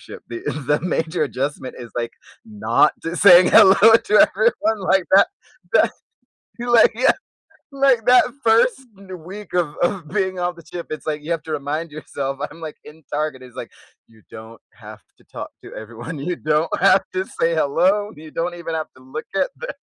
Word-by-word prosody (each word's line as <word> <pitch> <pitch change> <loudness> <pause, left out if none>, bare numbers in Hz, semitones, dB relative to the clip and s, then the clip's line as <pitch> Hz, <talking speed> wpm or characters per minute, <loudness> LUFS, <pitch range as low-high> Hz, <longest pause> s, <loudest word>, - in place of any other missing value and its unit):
ship - - -12
the 115 -1 -6 0.3
the 150 - +1
major 165 -1 -2
adjustment 135 -1 -4
is, 120 -1 -10
like, 115 -1 -3 0.3
not 210 -8 +1
just 165 +1 -3
saying 180 -2 +8
hello 200 -3 +8 0.2
to 220 -2 +2
everyone 220 - 0
like 190 -2 +3
that. 200 - +6 0.4
That - - +3 0.7
you, 240 0 -3
like 235 -1 +6
yeah. 245 +3 +3 0.6
Like, 270 -5 +2
that 250 0 +7 0.2
1st 230 - +3 0.2
n 195 -1 -16 0.2
week 200 +3 -10
of 170 -5 -1
of 175 -2 -1
being 190 -1 -2
off 175 0 -2
the 170 - -15
ship, 170 +1 -8
it's 155 - -7
like, 150 -1 -3
you 160 - -9
have 165 -3 -2
to 160 - -8
remind 150 +2 -3
yourself, 135 -2 -5
I'm, 165 - -15
like, 155 -2 -7
in 155 +1 -15
Target, 150 -3 -3
is 125 -1 -14
like, - - -8 0.4
"You 110 -3 -23
don't 110 +1 -11
have - - -13 0.2
to - - -23
talk - - -7
to - - -11
everyone. 120 +8 -8
You 175 +6 -3
don't 155 +1 0
have 195 - +5
to 185 +1 -2
say 165 -2 -1
hello. 180 +7 +1
You 155 0 -12
don't 175 +1 -3
even 170 -1 -6
have 160 -1 -3
to 130 - -18
look 130 +4 -8
at - - 0
the - - -7
165 Hz, 195 wpm, -20 LUFS, 150-200 Hz, 0.7 s, saying